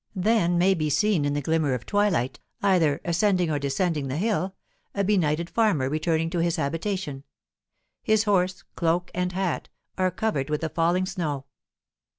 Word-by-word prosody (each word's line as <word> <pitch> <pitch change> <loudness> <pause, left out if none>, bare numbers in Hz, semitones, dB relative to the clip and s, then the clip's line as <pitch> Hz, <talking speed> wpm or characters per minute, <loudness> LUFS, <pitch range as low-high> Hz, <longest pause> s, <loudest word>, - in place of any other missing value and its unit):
Then 185 -3 +2
may 185 +3 +4
be 155 -4 -1
seen 155 +2 +2
in 145 0 0
the 145 - -2
glimmer 155 -3 +1
of 120 - -7
twilight, 200 - +1 0.2
either 170 -7 +3
ascending 180 -1 +2
or 145 - 0
descending 145 +1 -1
the 135 +2 -3
hill, 195 -1 -1 0.4
a 200 - +1
benighted 170 -5 +1
farmer 195 - +1
returning 160 +1 0
to 175 - -1
his 170 0 +1
habitation; 165 -2 -3 0.8
his 220 -1 +2
horse, 185 -3 +1
cloak, 170 +1 0
and 180 0 -1
hat, 190 -1 -2 0.3
are 185 0 +3
covered 180 -7 -2
with 150 0 -1
the 160 - -1
falling 170 +3 +1
snow. 160 -8 -3
170 Hz, 165 wpm, -25 LUFS, 150-190 Hz, 0.8 s, may